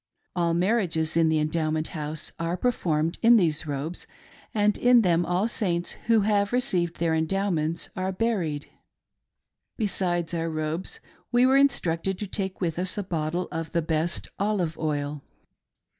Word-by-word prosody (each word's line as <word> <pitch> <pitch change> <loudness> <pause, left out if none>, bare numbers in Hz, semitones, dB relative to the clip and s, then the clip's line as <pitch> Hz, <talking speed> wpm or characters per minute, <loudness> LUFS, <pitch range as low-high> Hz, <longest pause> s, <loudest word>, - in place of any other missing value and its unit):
All 170 -2 +1
marriages 175 -5 +1
in 165 -1 +4
the 160 - +2
Endowment 155 0 0
House 155 -2 -5
are 165 +2 -1
performed 165 -8 0
in 235 +1 +7
these 160 -6 +1
robes, 145 +4 -4 0.4
and 210 -1 +2
in 245 -1 +5
them 175 -2 +2
all 180 +5 +1
Saints 175 -7 -1 0.2
who 225 -2 +5
have 200 -1 +2
received 185 -10 +1
their 165 -1 +1
Endowments 165 -1 0
are 185 0 -1
buried. 185 -8 -1 1.1
Besides 180 -6 -1
our 165 -1 -1
robes 155 +3 -2 0.3
we 245 +1 +5
were 260 +1 +4
instructed 195 -10 +2
to 210 - -4
take 190 -1 -3
with 170 -2 -1
us 185 +2 0
a 205 - -1
bottle 170 0 -2
of 165 -2 -4
the 170 - +1
best 160 +1 -1
olive 195 -6 0
oil. 145 -2 -2
175 Hz, 150 wpm, -26 LUFS, 160-200 Hz, 1.1 s, in